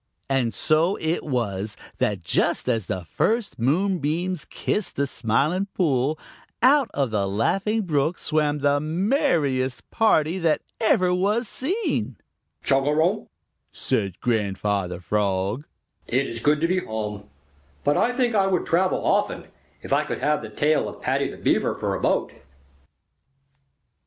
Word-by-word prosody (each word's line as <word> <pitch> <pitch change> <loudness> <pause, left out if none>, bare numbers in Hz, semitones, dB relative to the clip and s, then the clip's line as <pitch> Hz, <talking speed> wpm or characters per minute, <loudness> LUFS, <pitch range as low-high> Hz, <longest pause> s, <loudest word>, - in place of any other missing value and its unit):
And 130 -4 +2
so 160 - +2
it 160 +2 -1
was 105 -7 -2 0.2
that 100 -4 0
just - - +1
as 115 -7 0
the 90 -2 -3
first 215 - -1
moonbeams 170 - 0
kissed 210 - -2
the 140 - +1
Smiling 140 - 0
Pool, 145 -3 +1 0.5
out 275 0 +5
of 135 -5 0
the 100 -2 0
Laughing 195 - 0
Brook 155 -1 0
swam 150 -2 0
the 145 0 +3
merriest 155 - 0
party 180 -6 +2
that 165 -3 +1 0.2
ever 185 -5 +3
was 205 +6 +1
seen. 375 - -2 0.5
"Chugarum!" 150 +8 +2 0.4
said 100 -4 -2
Grandfather 100 -5 -1
Frog. 100 - -1 0.4
"It 130 +3 +1
is 115 - -5
good 150 +5 +2
to 165 - +3
be 185 +2 +1
home, 105 -3 -5 0.5
but 145 - +2
I 245 - +2
think 245 -1 0
I 195 -2 +3
would 185 -2 0
travel 185 +3 +1
often, - - 0 0.3
if - - -2
I - - +3
could - - -4
have 150 0 +1
the 110 - -7
tail 150 +8 +1
of - - -11
Paddy - - 0
the - - -9
Beaver - - +1
for - - -2
a - - -3
boat." - - +1
150 Hz, 140 wpm, -24 LUFS, 115-185 Hz, 0.5 s, out